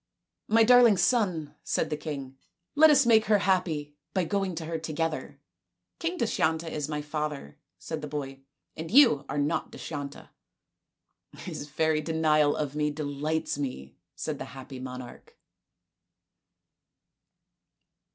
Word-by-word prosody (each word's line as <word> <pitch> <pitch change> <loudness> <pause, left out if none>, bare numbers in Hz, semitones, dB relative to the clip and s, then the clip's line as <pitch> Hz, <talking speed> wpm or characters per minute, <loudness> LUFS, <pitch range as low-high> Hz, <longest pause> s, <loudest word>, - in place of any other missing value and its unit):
" - - -59
My 225 - +7
darling 240 -3 +7
son," 180 - +1
said - - -1
the - - +1
king, 140 -3 -6 0.2
" 170 +1 -56
let 315 +2 +8
us 280 -3 +5
make 220 -2 +5
her 210 -1 +4
happy 180 -7 0 0.2
by 185 - +2
going 195 +1 -1
to 160 0 -5
her 165 0 -3
together." 160 0 -3 0.3
" - - -57
King 345 +2 -2
Dushyanta 165 - 0
is 150 -1 -3
my 150 -1 -3
father," 150 - -4 0.2
said 120 - -6
the 150 - -5
boy, 135 -2 -5 0.2
" - - -54
and 160 +1 -6
you 205 - +6
are - - -3
not 145 +3 -1
Dushyanta." 145 -3 -7 0.6
" - - -26
His 145 - -6
very 155 +1 +1
denial 155 -2 +2
of 145 -2 -3
me 150 0 +1
delights 150 +1 -2
me," 70 - -5 0.2
said - - -4
the - - -5
happy 130 0 -9
monarch. 125 -1 -9
155 Hz, 150 wpm, -28 LUFS, 145-180 Hz, 0.6 s, let